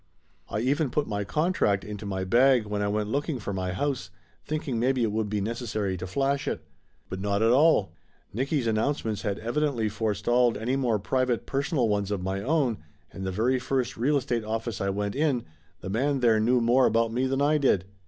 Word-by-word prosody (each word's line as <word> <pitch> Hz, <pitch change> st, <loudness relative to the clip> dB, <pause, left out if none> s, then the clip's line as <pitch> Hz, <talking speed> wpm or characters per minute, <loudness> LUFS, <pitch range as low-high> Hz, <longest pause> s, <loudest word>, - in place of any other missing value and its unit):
I 105 Hz, -, -2 dB
even 140 Hz, +4 st, +1 dB
put 145 Hz, +4 st, 0 dB
my 100 Hz, -1 st, -2 dB
contract 105 Hz, -, +1 dB
into 105 Hz, 0 st, -7 dB
my 95 Hz, -1 st, -2 dB
bag 120 Hz, +4 st, +4 dB
when 105 Hz, 0 st, -2 dB
I 105 Hz, -, 0 dB
went 105 Hz, 0 st, -1 dB
looking 145 Hz, +2 st, -1 dB
for 105 Hz, -3 st, -5 dB
my 95 Hz, -1 st, -2 dB
house, 125 Hz, -2 st, -2 dB, 0.3 s
thinking 150 Hz, -5 st, -3 dB
maybe 130 Hz, +1 st, +2 dB
it 110 Hz, -, +1 dB
would 110 Hz, 0 st, -1 dB
be 105 Hz, -1 st, -1 dB
necessary 110 Hz, -3 st, -2 dB
to 95 Hz, -, -6 dB
flash 135 Hz, +8 st, 0 dB
it. -, -, -3 dB, 0.4 s
But 95 Hz, -, -5 dB
not 100 Hz, +1 st, 0 dB
at 115 Hz, -, +4 dB
all. 130 Hz, -, +4 dB, 0.4 s
Nicky's 135 Hz, +3 st, -1 dB
an 110 Hz, -1 st, +1 dB
nouncements 110 Hz, -3 st, -1 dB
had 105 Hz, -3 st, -2 dB
evidently 120 Hz, -1 st, -1 dB
forestalled 110 Hz, +3 st, +1 dB
any 120 Hz, +4 st, -1 dB
more 125 Hz, -5 st, +1 dB
pri 130 Hz, +6 st, 0 dB
vate 120 Hz, -2 st, -1 dB
personal 140 Hz, -2 st, 0 dB
ones 100 Hz, -2 st, 0 dB
of 105 Hz, -2 st, -1 dB
my 95 Hz, +1 st, -2 dB
own, 130 Hz, -4 st, +1 dB, 0.3 s
and 95 Hz, 0 st, -5 dB
the -, -, -1 dB
very 120 Hz, +7 st, +1 dB
first 130 Hz, -1 st, -1 dB
real 140 Hz, +6 st, +2 dB
estate 120 Hz, -3 st, -1 dB
office 110 Hz, 0 st, -3 dB
I 100 Hz, -, 0 dB
went 100 Hz, +1 st, -2 dB
in, 140 Hz, -5 st, 0 dB, 0.4 s
the 95 Hz, -, -6 dB
man 135 Hz, +5 st, 0 dB
there 115 Hz, -3 st, +4 dB
knew 120 Hz, +3 st, +3 dB
more 125 Hz, +3 st, +4 dB
about 115 Hz, 0 st, +1 dB
me 130 Hz, +2 st, +1 dB
than 135 Hz, +1 st, -1 dB
I 150 Hz, +2 st, +3 dB
did. 100 Hz, -10 st, +2 dB
115 Hz, 210 wpm, -27 LUFS, 105-135 Hz, 0.4 s, bag